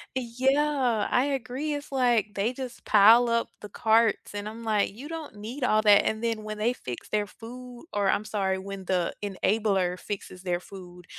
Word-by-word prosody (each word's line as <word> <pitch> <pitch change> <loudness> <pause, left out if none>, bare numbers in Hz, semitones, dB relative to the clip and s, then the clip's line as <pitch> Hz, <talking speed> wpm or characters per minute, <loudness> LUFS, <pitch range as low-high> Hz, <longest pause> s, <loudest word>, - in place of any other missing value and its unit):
Yeah, 260 -1 +1
I 250 - +3
agree, 275 +2 -2
it's 290 0 -7
like, 240 -6 +2
they 205 +3 0
just 255 -1 -8
pile 225 +3 +6
up 230 0 +1
the 210 - -8
carts, 220 +1 +2
and 205 +1 -4
I'm 225 +2 -9
like, 215 -3 +1
"You 245 +8 -10
don't 320 -6 -7
need 230 +7 -6
all 215 -3 +3
that," 205 -1 +6
and 220 +1 -2
then 225 -2 -1
when 215 0 -5
they 225 +4 +1
fix 125 - -8
their 210 -1 0
food 245 +4 -11
or 200 -1 +1
I'm 210 - +1
sorry, 195 -3 -1
when 195 0 -7
the 180 -2 0
enabler 195 -2 0
fixes 195 -3 -7
their 175 -2 -1
food, 180 -2 -12
220 Hz, 190 wpm, -27 LUFS, 200-245 Hz, -, pile